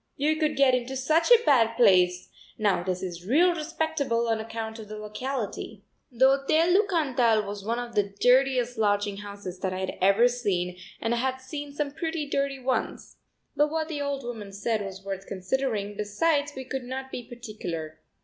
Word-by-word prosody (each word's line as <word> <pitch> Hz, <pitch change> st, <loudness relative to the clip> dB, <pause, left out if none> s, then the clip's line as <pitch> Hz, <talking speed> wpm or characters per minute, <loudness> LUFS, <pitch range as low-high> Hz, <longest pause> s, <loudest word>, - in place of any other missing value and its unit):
You 305 Hz, +3 st, +1 dB
could 305 Hz, -1 st, 0 dB
get 270 Hz, -1 st, +4 dB
into 250 Hz, +1 st, -1 dB
such 310 Hz, +6 st, +2 dB
a 475 Hz, -1 st, +7 dB
bad 230 Hz, -5 st, +4 dB
place; 180 Hz, -5 st, +4 dB, 0.3 s
now 205 Hz, -5 st, +2 dB
this 180 Hz, 0 st, -3 dB
is 175 Hz, -1 st, -6 dB
real 345 Hz, -, +4 dB
respectable 305 Hz, -7 st, -1 dB
on 225 Hz, -1 st, +1 dB
account 220 Hz, 0 st, -5 dB
of 215 Hz, -, -9 dB
the 215 Hz, +1 st, -7 dB
locality." 215 Hz, +3 st, -5 dB, 0.3 s
The 245 Hz, +2 st, +4 dB
Hotel 295 Hz, +6 st, +3 dB
du 405 Hz, +2 st, +4 dB
Cantal 250 Hz, -, +2 dB
was 200 Hz, 0 st, -6 dB
one 230 Hz, +3 st, -1 dB
of 240 Hz, -1 st, -5 dB
the 205 Hz, -2 st, +1 dB
dirtiest 250 Hz, -2 st, +3 dB
lodging 205 Hz, -1 st, +1 dB
houses 200 Hz, -3 st, -8 dB
that 185 Hz, -1 st, -2 dB
I -, -, -3 dB
had 190 Hz, 0 st, -4 dB
ever 200 Hz, +6 st, +5 dB
seen 195 Hz, -8 st, -1 dB, 0.2 s
and 230 Hz, -, 0 dB
I -, -, 0 dB
had 260 Hz, +2 st, 0 dB
seen 285 Hz, +2 st, -7 dB
some 285 Hz, 0 st, -2 dB
pretty 320 Hz, 0 st, -3 dB
dirty 275 Hz, -1 st, -1 dB
ones! 260 Hz, 0 st, -3 dB, 0.4 s
But 295 Hz, +1 st, +3 dB
what 320 Hz, +1 st, -2 dB
the 295 Hz, -3 st, -3 dB
old 280 Hz, -1 st, -2 dB
woman 220 Hz, -5 st, -7 dB
said 215 Hz, +2 st, -1 dB
was 195 Hz, 0 st, -8 dB
worth 195 Hz, -1 st, -5 dB
considering, 205 Hz, +1 st, -2 dB
besides 285 Hz, +9 st, 0 dB
we 265 Hz, -, -5 dB
could 265 Hz, 0 st, -4 dB
not 265 Hz, +1 st, -6 dB
be -, -, -4 dB
particular. 195 Hz, -10 st, -7 dB
240 Hz, 190 wpm, -27 LUFS, 205-280 Hz, 0.4 s, a